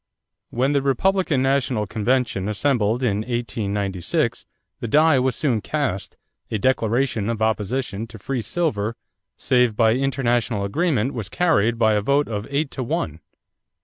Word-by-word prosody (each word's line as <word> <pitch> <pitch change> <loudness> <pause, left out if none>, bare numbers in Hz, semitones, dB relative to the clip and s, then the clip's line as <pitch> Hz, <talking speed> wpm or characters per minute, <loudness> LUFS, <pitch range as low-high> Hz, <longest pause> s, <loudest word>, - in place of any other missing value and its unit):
When 130 +4 0
the 140 - +2
Republican 145 +1 +1
national 135 -5 +1
convention 110 -1 0
assembled 115 0 +1
in 105 -5 +1
1896, 105 -5 -2 0.3
the - - -4
die 150 +3 +4
was 130 -1 +1
soon 125 -8 0
cast; 135 -10 -3 0.3
a 110 - -1
declaration 115 -1 +1
of 115 -2 -2
opposition 110 0 -1
to 110 - -11
free 125 +5 -3
silver 115 - -1 0.4
save 125 -3 +2
by 110 0 +4
international 120 -4 0
agreement 135 - 0
was 110 -4 -5
carried 115 - +2
by 110 -1 +3
a 105 - +2
vote 140 +6 +2
of 105 -1 -4
eight 140 +1 -1
to 135 - -5
one. 80 -9 -2
120 Hz, 145 wpm, -22 LUFS, 105-135 Hz, 0.4 s, die